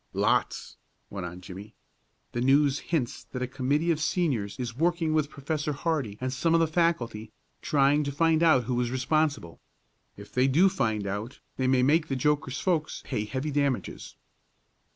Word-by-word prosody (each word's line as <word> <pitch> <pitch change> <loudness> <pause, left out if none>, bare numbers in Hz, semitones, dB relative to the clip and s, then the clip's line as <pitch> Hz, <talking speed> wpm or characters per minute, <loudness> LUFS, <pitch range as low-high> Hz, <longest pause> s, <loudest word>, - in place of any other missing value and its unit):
"Lots," - - 0 0.3
went 95 -3 -5
on 90 +1 -9
Jimmie. 95 +4 -10 0.6
"The 120 - -3
News 140 +2 +3
hints 120 -7 -2
that 125 0 -5
a - - +1
committee 140 +6 0
of 155 - 0
Seniors 140 - -1
is 120 -2 -4
working 165 +1 +1
with 155 -2 +1
Professor 150 +1 -3
Hardee 140 -9 -2
and 130 0 -3
some 165 +5 +1
of - - +4
the 165 - +4
faculty, 155 -10 -1 0.3
trying 145 +1 +3
to 140 - -2
find 160 +2 +2
out 160 -7 +5
who 125 +2 -3
was 120 -1 0
responsible. 130 - -1 0.6
If - - -12
they 130 +1 +2
do 165 +9 +4
find 110 - -1
out 105 +6 -5 0.2
they 130 - 0
may 130 -1 +3
make 155 +4 +3
the 135 - -2
joker's 140 0 0
folks 165 -5 -1
pay 105 - -2
heavy 130 +7 -3
damages." 140 -3 -2
140 Hz, 170 wpm, -27 LUFS, 120-155 Hz, 0.6 s, out